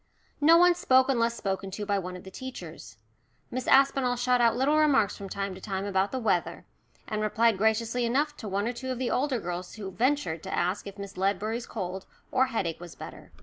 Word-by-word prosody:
No 325 +3 +7
one 355 +1 +6
spoke 260 -6 +3
unless 235 -3 +2
spoken 195 -1 -3
to 205 +2 -5
by 200 -1 +1
one 180 -1 -6
of 180 - -12
the 190 - -11
teachers. 170 - -9 0.5
Miss 255 +1 -4
Aspinall 270 -2 +4
shot 245 0 +2
out 230 -1 +4
little 275 +4 +2
remarks 275 -9 +3
from 195 -1 -8
time 195 0 -3
to 185 - -11
time 195 -1 -3
about 195 0 0
the 260 - -2
weather, 210 -8 -1 0.4
and 215 -1 -2
replied 220 0 +2
graciously 225 +3 +1
enough 285 +6 +1
to 215 - -7
one 200 +3 -1
or 245 - -1
two 260 +2 -6
of 255 - -2
the 250 0 -1
older 265 -2 0
girls 180 -1 -5
who 200 -3 -6
ventured 225 - 0
to - - -7
ask 180 +4 -1
if 200 0 -9
Miss 200 -1 -8
Ledbury's 210 +5 -1
cold, 190 -3 -5 0.2
or 260 +1 +3
headache, 195 -10 -2
was 175 -1 -10
better. - - -10
220 Hz, 215 wpm, -28 LUFS, 190-255 Hz, 0.5 s, No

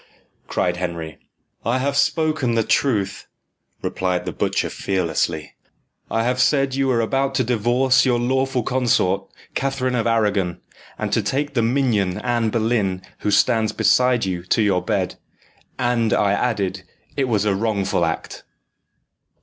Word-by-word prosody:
cried 90 -1 0
Henry. 85 -3 -5 0.4
"I 120 +3 +1
have 140 +2 -1
spoken 155 -4 +1
the 115 - +2
truth," 100 -7 0 0.6
replied 90 -1 -1
the - - -3
butcher - - -1
fearlessly. 85 -4 -1 0.6
"I 115 - 0
have 125 +2 +1
said 135 0 +2
you 135 0 +1
were 120 -3 +2
about 135 +4 0
to 130 - +2
divorce 125 +3 +2
your 125 -2 +2
lawful 130 +1 0
consort, 120 -7 +1 0.2
Catherine 135 -1 -1
of 115 -2 0
Arragon, 105 -6 +1 0.4
and - - -3
to - - +3
take 145 +2 -2
the 120 - +2
minion, 115 -7 +1
Anne 115 +1 0
Boleyn, 110 -5 0 0.2
who - - -1
stands 110 +1 +3
beside 125 -3 +3
you, 90 -2 -2
to 95 +5 +1
your 95 -3 +2
bed. - - -2 0.6
And 120 -3 +1
I 100 -1 +2
added, 100 -5 -1 0.3
it 135 - +1
was 105 -4 +1
a 105 - +2
wrongful 100 -3 0
act." 80 -1 -3
115 Hz, 145 wpm, -21 LUFS, 100-130 Hz, 0.6 s, to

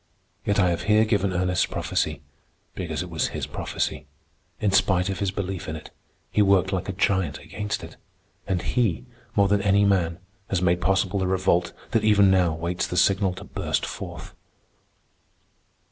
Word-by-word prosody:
Yet 100 0 +1
I 90 -3 +4
have 85 - -2
here 110 +1 +5
given 100 -3 +1
Ernest's 90 0 +1
prophecy - - -2 0.5
because 80 -3 -3
it 90 - -9
was 80 - 0
his - - -2
prophecy. - - -3 0.5
In 105 - +1
spite 95 -1 +3
of 95 - -3
his 100 - 0
belief 95 -2 -4
in 80 - -3
it, 80 - -10 0.4
he 105 - +3
worked 95 -1 +3
like 95 0 -2
a - - +1
giant 95 -5 0
against 105 0 -5
it, - - -10 0.5
and 95 -2 -1
he, 95 - 0 0.3
more 100 -1 +4
than 100 0 +2
any 100 0 +3
man, 90 -4 +2 0.3
has 95 - +1
made 90 0 +2
possible 95 +1 +1
the 95 - 0
revolt 90 -2 +1 0.2
that 115 -2 +2
even 100 -2 +5
now 90 -3 +3
waits 85 +2 -2
the 90 - -4
signal 95 0 +3
to - - -9
burst - - -2
forth. - - -7
95 Hz, 175 wpm, -25 LUFS, 90-100 Hz, 0.5 s, here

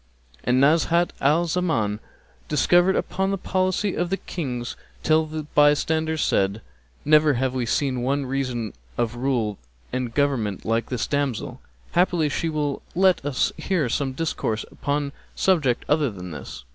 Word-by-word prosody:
'" - - -29
And 125 +1 +2
Nazhat 165 +4 +3
al 155 +5 +3
Zaman 160 - 0 0.5
discoursed 175 +5 +4
upon 190 +1 -1
the 195 - 0
policy 185 +2 0
of 175 0 -1
Kings 125 -8 -4 0.3
till 155 0 +3
the 155 0 -4
bystanders 155 +2 +2
said, 100 +3 +1 0.4
"Never 150 0 +5
have 130 +1 0
we 125 -2 -1
seen 130 0 0
one 140 +2 0
reason 125 -5 -2 0.2
of 120 -1 0
rule 120 -5 -1 0.3
and 125 -2 -2
government 120 -8 0
like 115 0 0
this 125 -3 -1
damsel! 140 -5 -2 0.3
Haply 175 -3 +2
she 165 +4 -1
will 150 -3 -2
let 185 -3 +4
us 145 -2 +1
hear 170 -10 0
some 135 +2 -1
discourse 130 -7 -2
upon 145 0 -2 0.2
subject 150 -10 +2
other 150 -2 +2
than 90 -4 -8
this." 75 - -8
145 Hz, 145 wpm, -24 LUFS, 120-160 Hz, 0.5 s, Never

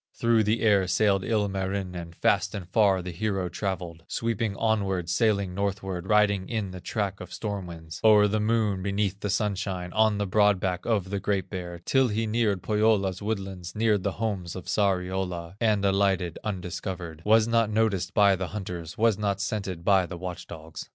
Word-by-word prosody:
Through 115 -2 +3
the 110 +2 +1
air 100 -4 +4
sailed 100 0 +2
Ilmarinen, 95 -5 -2
Fast - - +1
and 95 -4 -6
far 95 -2 +3
the 90 - -5
hero 95 0 -2
travelled, 90 -3 -4
Sweeping 115 -3 -1
onward, 95 -6 0
sailing 100 -3 +1
northward, 95 -2 -3
Riding 100 -3 +3
in 110 -5 -2
the 90 -1 -8
track 100 -2 -2
of 90 - -9
storm 100 -4 -4
winds, 80 -2 -9
O'er 105 -1 +7
the 110 +1 0
Moon, 105 -3 +1
beneath 100 0 -1
the 105 - -3
sunshine, 95 -3 -2
On 110 -1 +3
the 105 - 0
broad 105 0 +3
back 90 0 -2
of 100 -5 0
the 100 - -1
Great 95 -2 -1
Bear, 90 -2 -5
Till 135 -1 +3
he 110 0 -1
neared 105 -4 0
Pohyola's 105 -3 +2
woodlands, 95 -5 -4
Neared 105 -2 +2
the 95 +1 -1
homes 100 -6 -3
of 95 - -7
Sariola, 90 -2 -1
And 105 -3 +2
alighted 95 -3 +1
undiscovered, 90 -4 -5
Was 110 +1 +4
not 115 -2 +2
noticed 105 -4 0
by 100 -2 +5
the 95 0 -3
hunters, 90 -5 -6
Was 110 -2 +3
not 100 -2 0
scented 95 -4 -3
by 95 -3 +4
the 90 - -7
watch 90 0 -6
dogs. 80 -1 -9
100 Hz, 180 wpm, -27 LUFS, 90-105 Hz, -, O'er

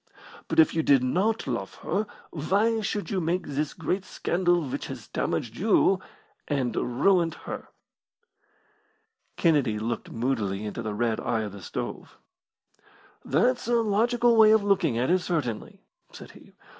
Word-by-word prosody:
But - - 0
if 160 - +6
you 160 - +1
did 140 -4 +4
not 195 - 0
love 115 -7 -4
her 205 +5 -1 0.2
why 205 +8 +1
should 205 +1 -3
you 190 -2 0
make 175 +2 -1
this 145 +1 -3
great 180 +4 -2
scandal 175 -1 0
which 130 - -4
has - - -8
damaged 115 -1 -2
you 195 -1 +3 0.5
and 130 -6 -1
ruined 165 +6 +2
her?" - - -6 1.7
Kennedy 145 -10 +2
looked 115 +1 -4
moodily 110 -5 -2
into 105 +2 -5
the 110 -2 -4
red 115 0 0
eye 110 - -1
of 105 -2 -4
the 100 0 -10
stove. 80 - -6 1.1
"That's 245 - +1
a 240 - +2
logical 235 +2 +2
way 220 -1 +8
of 220 -1 +5
looking 190 - +2
at 125 +7 +1
it, 185 - +4
certainly," 145 - -3 0.3
said - - -11
he. - - -17
160 Hz, 150 wpm, -26 LUFS, 120-200 Hz, 1.7 s, way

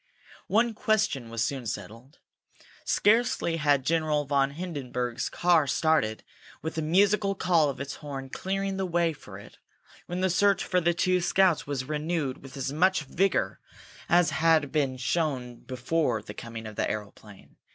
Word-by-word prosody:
One 230 +3 +2
question 215 - 0
was 115 +1 -1
soon 130 -4 -4
settled. 115 - -7 0.7
Scarcely 210 -6 +2
had 145 -4 +2
General 155 -2 +1
von 140 -1 +2
Hindenburg's 130 -8 -3
car 170 -4 +3
started, 145 -9 +1 0.4
with 160 - -3
the 160 - -2
musical 195 +5 +2
call 170 -6 +3
of 135 - -5
its 140 0 -5
horn 135 -3 -7
clearing 195 0 -2
the 190 -1 -1
way 170 -1 +1
for 105 -9 -12
it, 100 - -14 0.5
when 180 +1 -3
the 190 -1 +2
search 200 +2 +3
for 180 -1 +1
the 170 0 +2
two 180 +1 +2
scouts 180 -3 +2
was 135 -3 -3
renewed 150 -2 -2
with 135 0 -11
as 135 +1 -3
much 185 +1 +2
vigor 190 +7 0 0.5
as 175 -1 +4
had 160 -3 +3
been 140 -4 0
shown 130 -3 -1
before 125 -2 -1
the 105 - -8
coming 115 +1 -8
of 110 -1 -9
the - - 0
aeroplane. 105 -1 -8
155 Hz, 160 wpm, -27 LUFS, 130-180 Hz, 0.7 s, as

